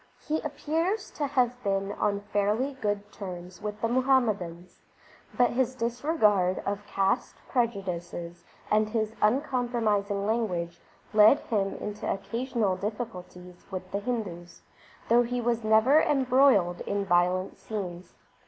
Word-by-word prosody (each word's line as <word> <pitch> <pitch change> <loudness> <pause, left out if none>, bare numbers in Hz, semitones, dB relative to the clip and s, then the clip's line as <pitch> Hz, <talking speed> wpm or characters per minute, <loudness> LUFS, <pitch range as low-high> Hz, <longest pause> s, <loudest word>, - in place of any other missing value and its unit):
He 310 +1 -1
appears 325 +7 -2
to 290 - -2
have 250 -3 +1
been 195 -1 0
on 200 0 -1
fairly 210 +6 0
good 205 -1 -2
terms 180 -3 -8
with 210 0 -5
Muhammadans, 230 -9 +1 0.6
but 245 - +4
his 255 +1 0
disregard 230 - +2
of 205 +1 -3
caste 195 +5 0
prejudices 175 -7 -3 0.3
and 215 0 +3
his 220 -1 -1
uncompromising 220 -5 +1
language 185 -7 -1 0.3
led 215 +6 +7
him 200 -4 -1
into 210 0 -4
occasional 225 0 -1
difficulties 180 -5 -6
with 185 -1 -6
the 200 - -1
Hindus, 205 -7 -5 0.4
though 235 +1 +5
he 245 +1 -1
was 235 -1 0
never 220 +8 +5
embroiled 255 -10 +3
in 200 0 -1
violent 180 +1 +1
scenes. 185 -5 -6
210 Hz, 120 wpm, -28 LUFS, 195-245 Hz, 0.6 s, led